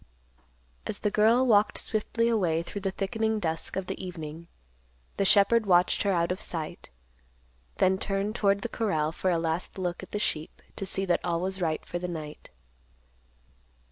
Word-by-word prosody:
As - - -2
the 210 - -1
girl 225 +5 +4
walked 210 -3 +4
swiftly 230 +2 0
away 175 -8 +1
through 200 +3 -6
the 195 - 0
thickening 220 +3 -1
dusk 160 -4 -2
of 190 - -2
the - - -5
evening, 165 -2 -7 0.7
the 195 - +2
shepherd 210 +3 +5
watched 180 -1 +4
her 200 - +2
out 170 -1 +1
of 185 - -3
sight; 160 -3 -5 0.9
then 190 0 +3
turned 200 +2 -1
toward 200 -2 +2
the - - -1
corral 160 -10 0
for 185 +3 -1
a 175 - +2
last 165 +3 -2
look 180 -2 -2
at 190 - -10
the - - -3
sheep, 155 -6 -2 0.2
to 195 - -3
see 195 0 0
that 175 -2 +1
all 170 -1 0
was 190 +1 -2
right 160 -2 -1
for 175 - -4
the 180 - -3
night. 155 -3 -7
190 Hz, 175 wpm, -28 LUFS, 170-210 Hz, 0.9 s, shepherd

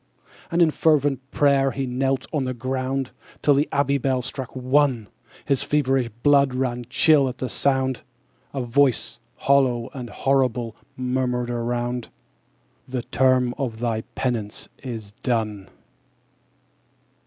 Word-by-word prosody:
8. - - -13
And 170 - +3
in 160 - +3
fervent 145 -4 +2
pray'r 140 -2 +2
he 135 - -1
knelt 130 +1 -1
on 150 - +1
the 130 -1 -2
ground, 130 +1 -2 0.3
Till 145 - +5
the 145 +2 +1
abbey 140 0 +1
bell 130 -1 0
struck 130 0 -6
One: 130 -2 +2 0.4
His 140 -2 +1
feverish 135 -4 +1
blood 140 -3 +4
ran 125 -2 -1
chill 145 -1 +4
at 125 - -7
the 130 - -3
sound: 130 -1 0 0.5
A 135 -2 -3
voice 130 +1 +1 0.3
hollow 130 -3 +3
and 125 -3 -6
horrible 125 -2 0 0.2
murmured 125 -1 -1
around 120 0 -2 0.8
_45 - - -16
'The 125 - 0
term 130 -1 +2
of 120 -5 -2
thy 115 -1 -1
penance 115 -5 -3
is 115 -6 -6
done!' 110 -5 -1
130 Hz, 135 wpm, -23 LUFS, 120-135 Hz, 0.8 s, Till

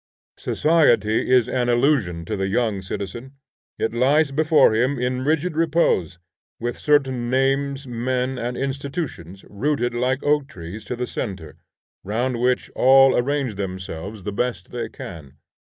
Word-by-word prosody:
Society 120 -9 +2
is 125 -2 +5
an 125 -1 0
illusion 120 - +1
to 105 - -3
the 95 -1 -1
young 105 -1 0
citizen. 100 +7 -6 0.4
It 110 - -1
lies 140 +5 +3
before 155 -4 +4
him 125 +5 +1
in 125 +1 -1
rigid 160 +3 0
repose, 155 - +1 0.4
with 120 +1 -3
certain 130 -5 +1
names, 135 +1 0
men 125 +1 -2
and 120 +1 -3
institutions 135 - -5
rooted 120 +2 -1
like 125 +2 0
oak 145 -1 +2
trees 90 +1 -9
to 125 - -4
the 125 +1 -3
centre, 95 -11 -6 0.5
round 120 +4 -2
which 125 0 0
all 135 +1 +6
arrange 135 -1 0
themselves 95 +1 -6
the 105 +1 -4
best 105 -5 -3
they 120 -2 -4
can. 80 -11 -10
125 Hz, 140 wpm, -22 LUFS, 105-135 Hz, 0.5 s, all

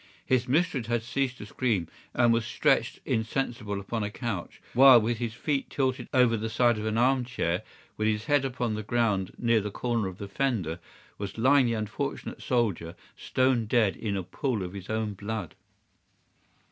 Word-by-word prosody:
His 130 -1 +1
mistress 140 -4 +1
had 120 -1 0
ceased 125 +2 -1
to - - -8
scream 105 -6 -1 0.3
and 120 -1 +4
was 115 0 +1
stretched - - +1
insensible 110 -2 -2
upon 110 +3 -3
a 105 - -1
couch, 105 -5 -5
while 130 -1 +9
with 115 +1 -1
his 115 -2 -3
feet 140 +2 -1
tilted 130 -2 -1
over 125 -3 +4
the 110 0 -3
side 120 0 +2
of 110 - -3
an 110 +1 -1
armchair, 125 -8 +1 0.4
and 110 - +2
his 110 0 0
head 145 +1 +3
upon 125 -4 -2
the 105 - -3
ground 105 -4 0
near 115 -2 +2
the 105 - -3
corner 115 0 -1
of 90 -1 -7
the 100 - -6
fender, 100 - -1 0.4
was 100 +1 -5
lying 130 +2 +5
the 115 - 0
unfortunate 110 -2 -4
soldier 100 -9 0 0.2
stone 130 -3 +1
dead 110 -4 +2
in 100 -3 -3
a 95 - -2
pool 110 - -2
of 90 0 -6
his 95 -2 -8
own 110 -1 -1
blood. 100 -3 -5
115 Hz, 180 wpm, -28 LUFS, 105-125 Hz, 0.4 s, while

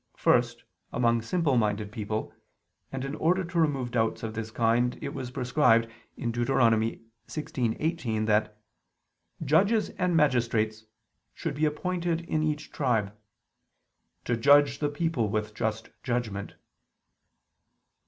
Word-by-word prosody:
First, - - +2 0.3
among 115 -1 +2
simple 145 +1 +1
minded 105 -2 0
people: 110 -1 -4 0.6
and 135 0 -4
in 135 - -4
order 180 +5 +1
to 175 0 -2
remove 135 -6 +1
doubts 115 -2 0
of 110 -1 -4
this 110 0 -4
kind, 115 +2 +1
it 140 -2 -5
was 125 -2 -5
prescribed 125 -3 +3 0.3
(Deut. 120 0 -2 0.8
16:18) 125 -4 -2
that 105 0 +1 0.9
"judges 195 - +3
and 180 -2 +2
magistrates" 115 -6 +1 0.5
should 165 -4 -3
be 150 +2 +1
appointed 170 +2 -1
in 160 -2 -1
each 155 -1 -2
tribe, 110 -8 0 1.1
"to 120 - +1
judge 140 +3 +5
the 145 - 0
people 145 -7 -1
with 105 0 -2
just 110 0 -3
judgment." 115 -5 -3
125 Hz, 120 wpm, -28 LUFS, 110-150 Hz, 1.1 s, judge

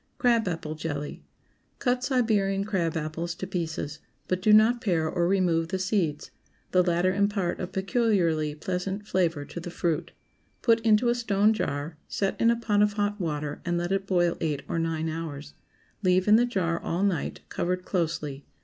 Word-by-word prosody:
CRAB 235 -4 +3
APPLE 165 -3 -3
JELLY. 150 -2 -5 0.5
✠ - - -41
Cut 250 0 +1
Siberian 215 -7 +1
crab 175 -6 -1
apples 165 +2 -3
to 190 - -5
pieces, 160 -5 -4 0.3
but 185 0 -1
do 215 - +4
not 220 +3 +6
pare 165 -6 +1
or 170 +2 0
remove 175 -4 +2
the 190 +2 -2
seeds. 185 -6 -1 0.4
The 180 - +5
latter 180 +1 +2
impart 200 -2 0
a 180 - -3
peculiarly 190 - +1
pleasant 185 +5 -3
flavor 170 -7 0
to 145 +4 -7
the 175 - -6
fruit. 170 -2 -1 0.5
Put 230 -1 +4
into 225 +1 +3
a - - +4
stone 215 -3 +2
jar, 150 -5 -3
set 195 -1 -1
in 230 - +5
a 235 - +4
pot 210 -3 +1
of 210 0 +3
hot 205 0 -1
water, 150 -3 -3
and 175 -1 -1
let 175 +1 -2
it 195 0 0
boil 175 -3 +2
eight 150 -4 -1
or 165 - -1
nine 165 -1 -1
hours. 155 -3 -5 0.5
Leave 185 -1 +3
in 210 - +7
the 240 +2 +4
jar 170 -7 0
all 175 +4 -1
night, 190 -6 -1
covered 180 +1 -2
closely. 155 -6 -2
180 Hz, 180 wpm, -27 LUFS, 165-205 Hz, 0.5 s, in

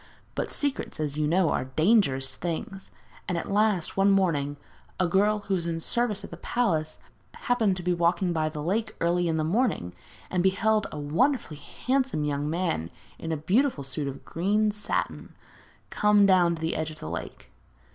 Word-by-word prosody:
But - - -2
secrets, 285 - -2
as 150 -2 -2
you 150 0 0
know, 170 +1 +3
are - - 0
dangerous 135 - +2
things, 180 - -5 0.4
and 180 - 0
at 170 - -4
last, 205 -4 +1
one 195 +1 +4
morning, 155 -8 +1 0.4
a 185 - +3
girl 205 +4 +2
who 200 - -3
was 170 -3 -1
in 165 -1 -2
service 235 +4 0
at - - -9
the - - -8
palace 160 -11 -1 0.4
happened 220 -6 +1
to 180 - -6
be 180 0 +1
walking 175 +1 +1
by 155 -1 0
the 150 -1 -6
lake 210 +7 -1
early 175 +1 +1
in 160 -1 0
the 155 - 0
morning 180 - 0 0.4
and 180 - +1
beheld 210 +3 +2
a - - -6
wonderfully 160 - 0
handsome 255 - -1
young 145 0 -1
man, 165 - -1 0.3
in 165 - -4
a 160 - 0
beautiful 195 - +1
suit 140 +2 -3
of 135 - -7
green 210 +5 +1
satin, 210 0 -3 0.6
come 210 -1 +4
down 180 -3 +4
to 160 - -10
the 160 +1 -1
edge 160 0 -2
of 155 - -10
the - - -8
lake. 85 +2 -7
175 Hz, 185 wpm, -27 LUFS, 155-210 Hz, 0.6 s, one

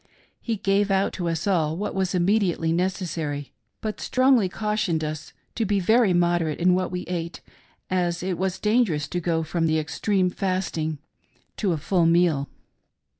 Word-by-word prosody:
He 230 - -2
gave 200 0 +1
out 195 0 +1
to 175 -3 -2
us 165 0 -2
all 165 -5 +1
what 205 - -3
was 190 -1 0
imme 190 +5 +3
diately 165 -4 0
necessary, 165 -6 -2 0.3
but 215 -1 -4
strongly 255 -6 +3
cautioned 210 -6 -1
us 155 0 -5 0.2
to 230 - -1
be 205 -1 +1
very 220 +2 +4
moder 175 -2 +2
ate 150 - -4
in 180 +1 +4
what 185 0 0
we 180 0 -3
ate, 170 -3 -5 0.5
as 175 -1 -1
it 180 -2 -2
was 190 -1 -1
dangerous 210 -10 +1
to 180 - -2
go 165 -1 0
from 165 +1 -1
the 160 0 +2
extreme 185 +5 0
of 180 - -1
fasting 175 -5 -2 0.6
to 200 -4 0
a 165 - 0
full 170 +3 +1
meal. 165 -4 +2
180 Hz, 175 wpm, -24 LUFS, 165-195 Hz, 0.6 s, very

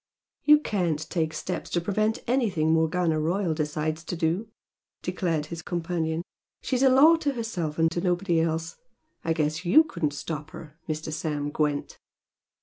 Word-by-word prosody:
"You 300 0 +8
can't 170 - -1
take 160 -3 0
steps 180 +3 -4
to 175 - +1
prevent 215 +5 0
anything 200 -11 +1
Morgana 160 0 +2
Royal 170 +2 0
decides 155 +1 -2
to 175 - -3
do!" 170 +6 0 0.6
declared 175 -4 -1
his 170 - -5
companion. 165 -1 -2 0.4
"She's 255 -1 -1
a 270 - +6
law 295 +6 +7
to 290 -3 -1
herself 185 - -3
and 165 0 +3
to 170 - -2
nobody 175 -1 +1
else. 165 0 -1 0.5
I 165 - +1
guess 155 +1 -1
YOU 195 - +6
couldn't 170 - -2
stop 155 +1 -5
her, 155 0 -11
Mr. 155 0 -3
Sam 150 -2 -2
Gwent!" 150 -1 -1
165 Hz, 155 wpm, -26 LUFS, 155-190 Hz, 0.6 s, You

